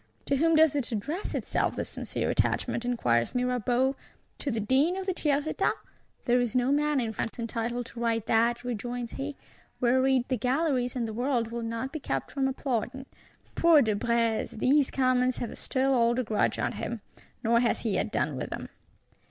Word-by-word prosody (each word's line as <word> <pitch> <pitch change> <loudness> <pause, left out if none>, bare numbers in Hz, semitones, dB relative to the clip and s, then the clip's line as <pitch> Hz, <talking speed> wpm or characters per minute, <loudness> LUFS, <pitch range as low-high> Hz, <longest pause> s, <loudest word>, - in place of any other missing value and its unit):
—'To 275 - +1
whom 330 +3 +3
does 315 -2 +5
it 275 -4 -1
address 290 - -3
itself, - - -1
this - - -3
sincere - - -3
attachment?' 235 - 0
inquires 120 - +1
Mirabeau. 250 +1 +1 0.4
'To 285 - -2
the 225 -4 -1
Dean 270 - +2
of 385 - -4
the 375 - 0
Tiers 295 -4 +1
Etat.'—'There 250 -4 -2
is 240 -2 -2
no 250 +1 +2
man 295 0 +2
in 225 -3 -2
France 220 - -3
entitled 235 +1 -3
to 235 - -10
write 230 -2 0
that,' 235 +2 +2
rejoins 245 0 -4
he; 280 +1 -5 0.4
whereat 260 +1 +3
the 255 - 0
Galleries 255 +1 0
and 240 -2 -1
the 220 - -5
World 240 -1 0
will 235 0 -3
not 230 +3 -3
be 310 - -3
kept 135 - -3
from 270 -2 0
applauding. 265 0 -2 0.5
Poor 330 -4 +5
De 220 -2 +1
Brézé! 230 +1 0
These 275 +4 +3
Commons 255 -1 +2
have 235 - -4
a - - -8
still 270 +1 0
older 240 0 +2
grudge 215 -2 +1
at - - -1
him; - - -4 0.4
nor 235 +1 +4
has 240 -1 +1
he 225 - -1
yet - - 0
done - - 0
with - - -4
them. - - -6
250 Hz, 185 wpm, -28 LUFS, 230-270 Hz, 0.5 s, does